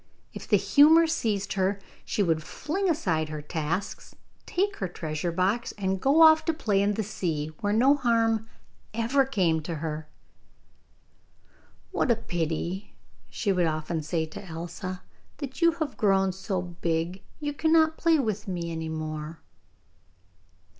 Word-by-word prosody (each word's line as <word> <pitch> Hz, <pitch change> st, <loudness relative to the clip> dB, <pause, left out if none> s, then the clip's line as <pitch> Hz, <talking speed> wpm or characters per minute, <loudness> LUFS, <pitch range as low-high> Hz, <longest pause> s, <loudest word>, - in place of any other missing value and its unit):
If -, -, -8 dB
the -, -, +5 dB
humour 315 Hz, +3 st, +6 dB
seized 220 Hz, -11 st, -1 dB
her, 195 Hz, +1 st, 0 dB, 0.2 s
she 205 Hz, -, 0 dB
would 165 Hz, -3 st, +1 dB
fling 360 Hz, -, -2 dB
aside 165 Hz, -, 0 dB
her 155 Hz, -1 st, -5 dB
tasks, 160 Hz, +5 st, -4 dB, 0.3 s
take 400 Hz, +3 st, 0 dB
her 190 Hz, -, -2 dB
treasure 160 Hz, -1 st, -3 dB
box, 190 Hz, +8 st, 0 dB
and 190 Hz, -2 st, -2 dB
go 290 Hz, +4 st, +5 dB
off 315 Hz, 0 st, +7 dB
to 325 Hz, -, 0 dB
play 210 Hz, -10 st, +1 dB
in 205 Hz, +1 st, +1 dB
the 220 Hz, -, -1 dB
sea, 160 Hz, -7 st, -3 dB
where 205 Hz, -, 0 dB
no 250 Hz, +6 st, +5 dB
harm 225 Hz, -4 st, +1 dB, 0.5 s
ever 245 Hz, +4 st, +2 dB
came 175 Hz, -10 st, +1 dB
to 165 Hz, +2 st, -4 dB
her. 155 Hz, 0 st, -4 dB, 1.8 s
'What -, -, 0 dB
a 235 Hz, -, +5 dB
pity,' 175 Hz, 0 st, -3 dB, 0.3 s
she 205 Hz, -, -1 dB
would 180 Hz, -3 st, +2 dB
often 155 Hz, +1 st, -2 dB
say 160 Hz, +1 st, -1 dB
to 155 Hz, -, -9 dB
Elsa, 175 Hz, +1 st, -6 dB, 0.3 s
'that 275 Hz, +1 st, -7 dB
you 335 Hz, 0 st, +5 dB
have 315 Hz, -3 st, -4 dB
grown 195 Hz, -3 st, +3 dB
so 190 Hz, 0 st, -3 dB
big, 170 Hz, +1 st, -2 dB, 0.2 s
you 295 Hz, -1 st, -3 dB
cannot 320 Hz, +1 st, +3 dB
play 330 Hz, -1 st, +3 dB
with 215 Hz, -7 st, -2 dB
me 170 Hz, -3 st, -3 dB
any 160 Hz, -1 st, -4 dB
more. 155 Hz, 0 st, -5 dB
195 Hz, 150 wpm, -27 LUFS, 165-260 Hz, 1.8 s, off